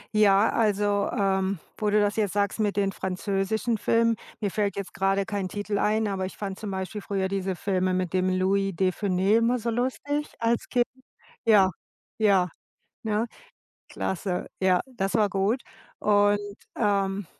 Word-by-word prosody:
Ja, 205 0 +5
also, 205 -2 +1
ähm, 195 -4 0 0.2
wo 210 -1 0
du 210 +1 +3
das 205 0 +1
jetzt 210 -4 0
sagst 205 +1 0
mit 205 -1 0
den 195 -1 +1
französischen 195 +4 -1
Filmen, 230 +1 +2 0.2
mir 205 -2 -1
fällt 200 -2 -1
jetzt 200 - -5
gerade 195 0 +1
kein 200 -4 -3
Titel 205 0 -3
ein, 215 +1 +1
aber 190 -2 -2
ich 185 - -8
fand 195 -1 -4
zum 210 -3 -5
Beispiel 190 +2 -4
früher 195 -2 -1
diese 190 -1 -2
Filme 185 -1 0
mit 185 -1 -1
dem 185 0 +2
Louis 195 +1 +1
de 185 +1 +2
Funès 195 +2 +2
immer 240 +2 +2
so 235 +1 -2
lustig, 260 +5 -2
als 230 0 0
Kind. 245 -1 +2 0.6
Ja, 200 -4 +6 0.5
ja, 195 -4 +4 0.6
ne? 220 +1 0 0.6
Klasse. 180 -1 -2
Ja, 185 -1 +3
das 195 -6 -2
war 210 -2 +3
gut. 205 +6 0 0.4
Und, 205 0 +3 0.4
ähm, 200 -2 +1
200 Hz, 160 wpm, -26 LUFS, 190-215 Hz, 0.6 s, Ja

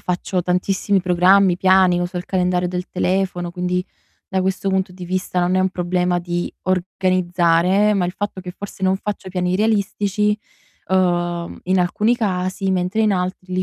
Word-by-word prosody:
faccio 180 0 -2
tantissimi 190 +2 +1
programmi, 180 +1 +4
piani, 185 -1 +4
uso 175 +1 -3
il 180 - -3
calendario 180 -1 0
del 180 +1 -4
telefono, 180 -1 -1
quindi 180 0 -1 0.4
da 190 - 0
questo 190 +1 -1
punto 190 0 0
di 180 0 -9
vista 185 0 -2
non 180 +1 +1
è 185 - +3
un 190 - +2
problema 180 0 0
di 175 0 -3
organizzare, 185 +1 +2
ma 190 -3 +1
il - - -2
fatto 200 0 -5
che 180 -1 -7
forse 195 +1 -10
non 190 0 +3
faccio 200 -1 -5
piani 180 -1 -1
realistici, 210 0 +1 0.5
uhm, 175 -2 0
in 185 +1 +2
alcuni 210 +6 +1
casi, 190 -2 -1
mentre 185 +4 0
in 215 -1 +3
altri 185 0 -3
li 185 - +1
185 Hz, 165 wpm, -20 LUFS, 180-190 Hz, 0.5 s, programmi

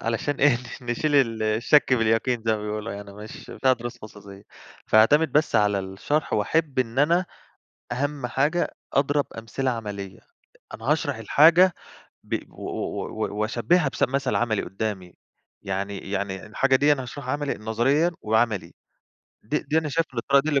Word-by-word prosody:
علشان 115 +6 -1
إيه، 140 -4 +5 0.2
ن - - -13
نشيل 145 +5 0
ال 115 -5 +2
الشك 115 +6 +3
باليقين 115 +1 +1
زي 110 - +4
ما 105 - -7
بيقولوا، 105 +1 -4
يعني 100 0 -8
مش 105 +2 -10
بتاع 130 -1 +2
دروس 120 0 -5
خصوصية، 100 -2 -12 0.4
فهاعتمد 140 +7 +4
بس 150 +1 +2
على 105 -1 +3
الشرح 95 +11 -2
وأحِبّ 140 +6 0
إن 125 0 -1
أنا 170 +5 +3 0.7
أهم 140 +1 -2
حاجة 150 +7 0 0.2
أضرب 145 +1 +2
أمثلة 125 +4 -2
عملية، 100 -4 -6 0.6
أنا - - -9
هاشرح - - -1
الحاجة 170 +4 +5 0.5
ب - - -2
و - - -12
و - - -4
و 105 - -4
وأشبهّها 120 +9 +2
بث - - -2
بمثَل 135 0 0
عمَلي 110 -4 +1
قدَّامي، 95 -3 -5 0.5
يعني 100 +1 -3
يعني 95 -1 -3
الحاجة 130 +5 +2
ديًا 145 +2 +4
هاشرحها 130 +1 -6
عمِلي 145 -1 -1
نظريًا 125 +10 +1
وعملي، 110 -5 0 0.7
دي - - -1
دي 155 - 0
أنا 160 -1 -1
شايف 165 +2 0
إن 120 - -4
الطريقة 140 +4 +3
دي 155 - -3
اللي 140 -3 +2
120 Hz, 160 wpm, -24 LUFS, 105-145 Hz, 0.7 s, إيه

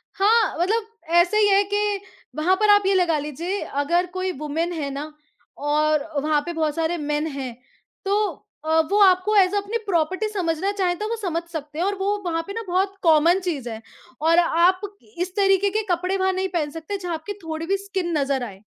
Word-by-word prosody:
हाँ, 420 -1 +3
मतलब 425 +5 +1 0.3
ऐसे 350 +5 +4
ही 420 -1 +5
है 395 +1 +5
कि 415 -1 +1 0.4
वहाँ 350 +5 +2
पर 425 -1 +3
आप 410 0 +6
ये 390 - +3
लगा 345 -4 +3
लीजिए, 335 +7 -4
अगर 340 +6 0
कोई 370 0 -2
वुमन 320 +3 -2
है 295 -4 -3
ना 290 +3 -5 0.6
और 305 0 +2
वहाँ 300 0 +1
पे 345 - -4
बहुत 310 -2 -1
सारे 330 +1 0
मेन 295 +1 -1
हैं 270 -4 -5 0.5
तो 400 +1 +2 0.5
अ, 320 +1 +3
वो 410 - +3
आपको 375 +3 +4
एज़ 380 0 +4
अ, - - +3
अपनी 405 +3 -1
प्रॉपर्टी 375 +4 0
समझना 370 -2 -1
चाहें, 370 -3 0
तो 425 - -2
वो 465 - -1
समझ 340 -4 -1
सकते 300 -1 -6
हैं 350 - +1
और 400 +1 0
वो 400 +2 0
वहाँ 330 -1 0
पे 400 - -5
ना 455 - -3
बहुत 380 +2 0
कॉमन 330 +2 +5
चीज़ 310 -10 -3
है 220 -1 -7 0.4
और 330 +2 +4
आप 350 +2 +3 0.4
इस 360 +2 -3
तरीक़े 390 0 +3
के 430 +2 0
कपड़े 365 +3 0
वहाँ 380 0 +2
नहीं 380 +1 -1
पहन 310 -4 0
सकते 325 +6 -5
जहाँ 355 -3 -4
आपकी 320 +6 -5
थोड़ी 320 0 -4
भी 390 +3 +1
स्किन 380 -4 -2
नज़र 275 -2 0
आए। 195 -5 -8
350 Hz, 210 wpm, -23 LUFS, 315-390 Hz, 0.6 s, आप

